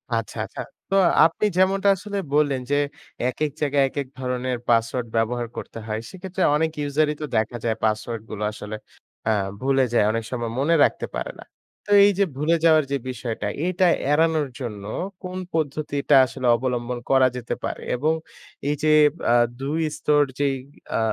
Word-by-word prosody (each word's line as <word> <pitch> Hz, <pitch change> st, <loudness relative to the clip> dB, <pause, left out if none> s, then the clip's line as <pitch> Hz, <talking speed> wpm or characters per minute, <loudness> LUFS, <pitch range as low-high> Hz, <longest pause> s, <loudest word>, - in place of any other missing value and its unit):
আচ্ছা, -, -, -3 dB
আচ্ছা। -, -, -7 dB, 0.3 s
তো 195 Hz, -, +1 dB, 0.3 s
আপনি 165 Hz, +6 st, +1 dB
যেমনটা 195 Hz, +2 st, +3 dB
আসলে 205 Hz, +1 st, -6 dB, 0.2 s
বললেন 145 Hz, -3 st, +2 dB
যে, -, -, +4 dB, 0.5 s
একেক 150 Hz, +3 st, -2 dB
জায়গায় 145 Hz, -1 st, +3 dB
একেক 140 Hz, 0 st, -4 dB
ধরনের 125 Hz, -1 st, -2 dB
পাসওয়ার্ড 115 Hz, +1 st, +1 dB
ব্যবহার 120 Hz, +1 st, 0 dB
করতে 115 Hz, -, -7 dB
হয়। 110 Hz, 0 st, -2 dB
সেক্ষেত্রে 190 Hz, 0 st, -4 dB
অনেক 160 Hz, +1 st, +1 dB
ইউজারই 150 Hz, +1 st, +1 dB
তো -, -, -1 dB
দেখা 110 Hz, +2 st, 0 dB
যায় 110 Hz, -1 st, +1 dB
পাসওয়ার্ডগুলো 110 Hz, -1 st, -2 dB
আসলে 105 Hz, 0 st, -7 dB, 0.5 s
অ্যা 110 Hz, -, +3 dB, 0.3 s
ভুলে 135 Hz, -1 st, +3 dB
যায়। 105 Hz, -, +4 dB
অনেক 115 Hz, 0 st, -2 dB
সময় 120 Hz, -2 st, -3 dB
মনে 160 Hz, +5 st, +3 dB
রাখতে -, -, +1 dB
পারে -, -, -3 dB
না। -, -, -9 dB, 0.4 s
তো 205 Hz, -, -6 dB
এই 205 Hz, -, +5 dB
যে 200 Hz, -, +6 dB
ভুলে 155 Hz, +4 st, +2 dB
যাওয়ার 155 Hz, -1 st, +6 dB
যে 140 Hz, -, +2 dB
বিষয়টা, 115 Hz, -4 st, -4 dB, 0.2 s
এইটা 185 Hz, +1 st, +2 dB, 0.3 s
এড়ানোর 160 Hz, -1 st, +2 dB
জন্য 105 Hz, -6 st, -5 dB, 0.4 s
কোন 185 Hz, 0 st, -5 dB, 0.2 s
পদ্ধতিটা 145 Hz, -2 st, 0 dB
আসলে 125 Hz, 0 st, -4 dB
অবলম্বন 125 Hz, -1 st, -2 dB
করা 135 Hz, -1 st, +5 dB
যেতে 120 Hz, -, -3 dB
পারে? -, -, -4 dB
এবং 150 Hz, +6 st, +1 dB, 0.6 s
এই 145 Hz, -, +1 dB
যে 155 Hz, -, +4 dB, 0.4 s
আ -, -, +5 dB, 0.3 s
২ 150 Hz, +4 st, -1 dB, 0.2 s
স্তর 150 Hz, 0 st, +3 dB, 0.2 s
যেই 140 Hz, -1 st, +2 dB, 0.4 s
আ -, -, +1 dB
135 Hz, 165 wpm, -23 LUFS, 120-155 Hz, 0.6 s, যে